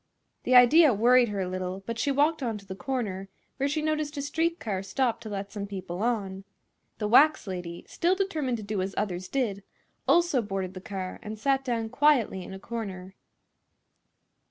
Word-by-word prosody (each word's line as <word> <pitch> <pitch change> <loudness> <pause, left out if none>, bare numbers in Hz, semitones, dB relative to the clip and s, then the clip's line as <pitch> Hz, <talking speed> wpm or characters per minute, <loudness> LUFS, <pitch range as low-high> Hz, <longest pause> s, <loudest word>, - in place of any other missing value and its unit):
This 255 - +2
idea 255 +2 +7
worried 240 +2 +5
her 200 -2 -2
a 185 - -2
little, 185 +1 -4
but 230 +1 -4
she 285 - +1
walked 295 +3 +2
on 230 -4 -2
to 200 - -13
the 190 - -6
corner, 195 -4 -4 0.3
where 275 +1 0
she 305 +1 -1
noticed 305 -1 -1
a 280 - -2
street 330 +4 -1
car 195 -4 -3
stop 235 +5 -1
to 220 - -7
let 200 -1 -5
some 200 -2 -5
people 190 -2 -6
on. 200 -5 -1 0.5
The 210 - -2
wax 290 +7 +5
lady, 180 -3 -6
still 355 +2 +1
determined 315 -11 -1
to 215 - -7
do 205 -1 -2
as 190 +1 -4
others 185 -3 -2
did, 225 -8 -1 0.5
also 340 -7 +4
boarded 195 -3 -4
the 185 - -8
car 185 -1 -6
and 215 -1 -7
sat 270 +4 +1
down 230 -3 -2
quietly 255 -10 +2
in - - -9
a 190 - -6
corner. 195 -4 -6
220 Hz, 190 wpm, -27 LUFS, 195-275 Hz, 0.5 s, idea